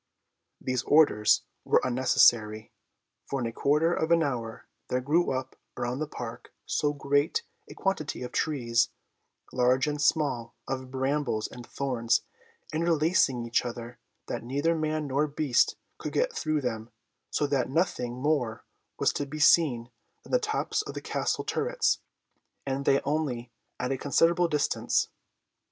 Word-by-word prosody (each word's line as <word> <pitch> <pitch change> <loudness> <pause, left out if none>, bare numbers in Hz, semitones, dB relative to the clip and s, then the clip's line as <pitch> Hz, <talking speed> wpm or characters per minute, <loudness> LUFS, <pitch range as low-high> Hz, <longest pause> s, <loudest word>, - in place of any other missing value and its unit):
These 130 -2 -1
orders 145 -9 +4 0.2
were - - +4
unnecessary, 115 -4 +3 0.6
for 140 - -2
in 120 - -2
a 115 - -2
quarter 150 +7 +2
of 160 -1 -1
an 170 -1 +4
hour 120 -4 -4 0.2
there 125 - 0
grew 150 +7 +2
up 130 0 -3 0.2
around 120 +2 -2
the 155 - -2
Park 120 -5 -8
so 145 - +1
great 145 - +1 0.3
a - - -10
quantity 170 -9 -2
of 125 - -6
trees, 120 -7 +1 0.6
large 125 +1 +3
and 150 -1 -2
small, 130 -7 +1
of 130 -1 -4
brambles 130 -4 -1
and 120 -1 -11
thorns, 120 -4 0 0.5
interlacing 160 -6 +2
each 120 +1 +1
other, 120 0 -7 0.3
that - - -4
neither 140 +7 +1
man 155 -1 -1
nor 140 +2 +1
beast 140 -4 +2 0.2
could - - -5
get - - +1
through 155 -1 0
them, 115 -3 -3 0.4
so 150 - 0
that 140 -3 0
nothing 130 -6 0
more 130 -4 -1 0.3
was - - +2
to 145 - -3
be 155 +3 -6
seen 135 -6 +4 0.3
than - - -13
the - - +4
tops 435 -1 -1
of 425 - -8
the - - -4
Castle - - -1
turrets, - - 0 0.7
and 135 0 -2
they 140 - +4
only 135 -5 -2 0.3
at 125 +1 -1
a 135 - -1
considerable 170 +4 +3
distance. 150 -3 +1
140 Hz, 150 wpm, -28 LUFS, 120-155 Hz, 0.7 s, orders